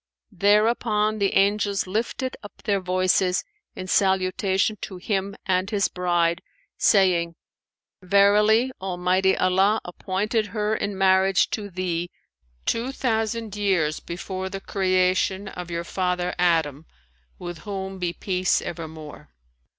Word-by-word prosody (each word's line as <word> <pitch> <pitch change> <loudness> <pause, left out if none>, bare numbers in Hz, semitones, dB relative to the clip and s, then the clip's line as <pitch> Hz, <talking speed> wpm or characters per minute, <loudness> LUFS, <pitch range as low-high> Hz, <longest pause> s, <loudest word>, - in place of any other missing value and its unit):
'" - - -55
Thereupon 215 0 +3
the 200 -1 +1
Angels 200 0 +2
lifted 230 +6 -2
up 205 - -13
their 200 -2 +1
voices 185 0 +1 0.3
in 185 - -6
salutation 190 +2 +1
to 190 - -6
him 195 +1 -2
and 185 0 +1
his 205 -2 +1
bride, 175 -1 0 0.3
saying, 175 -5 +3 0.7
"Verily, 210 +5 +4
Almighty 185 +1 +1
Allah 190 +4 +3
appointed 210 +5 -2
her 210 0 -1
in 200 -2 -3
marriage 190 0 +3
to 205 -2 -4
thee 175 -2 -3 0.6
two 235 +3 -1
thousand 225 -4 -2
years 185 -7 +1
before 185 +2 -5
the 195 0 -5
creation 185 0 +1
of 180 -2 -8
your 170 0 -3
father 180 0 -1
Adam 160 -4 +1 0.5
(with 175 -2 -7
whom 195 -2 -6
be 175 -1 -1
peace 185 0 0
evermore!)." 160 - -8
190 Hz, 120 wpm, -24 LUFS, 180-205 Hz, 0.7 s, Verily